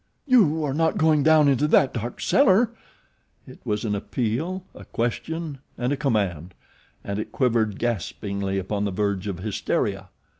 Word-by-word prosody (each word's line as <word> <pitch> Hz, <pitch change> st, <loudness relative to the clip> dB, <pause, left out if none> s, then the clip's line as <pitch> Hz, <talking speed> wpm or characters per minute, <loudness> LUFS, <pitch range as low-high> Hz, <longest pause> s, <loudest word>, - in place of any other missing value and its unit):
"You 190 Hz, -, +4 dB
are 140 Hz, -3 st, -1 dB
not 160 Hz, +2 st, +1 dB
going 155 Hz, -2 st, +3 dB
down 155 Hz, 0 st, +5 dB
into 140 Hz, +2 st, +3 dB
that 140 Hz, -3 st, +4 dB
dark 120 Hz, 0 st, -5 dB
cellar!" 235 Hz, -4 st, +4 dB, 0.7 s
It -, -, -13 dB
was 105 Hz, +1 st, -2 dB
an 105 Hz, -, 0 dB
appeal, 125 Hz, -, -2 dB
a -, -, -11 dB
question, 150 Hz, +5 st, -3 dB, 0.2 s
and 125 Hz, +3 st, 0 dB
a -, -, +1 dB
command; 100 Hz, -, -1 dB, 0.5 s
and 100 Hz, +1 st, -3 dB
it -, -, -5 dB
quivered 115 Hz, -5 st, +1 dB
gaspingly 100 Hz, -3 st, -2 dB
upon 100 Hz, +2 st, -2 dB
the -, -, 0 dB
verge 100 Hz, 0 st, -1 dB
of 95 Hz, -3 st, -3 dB
hysteria. 100 Hz, -2 st, -2 dB
120 Hz, 155 wpm, -24 LUFS, 100-155 Hz, 0.7 s, down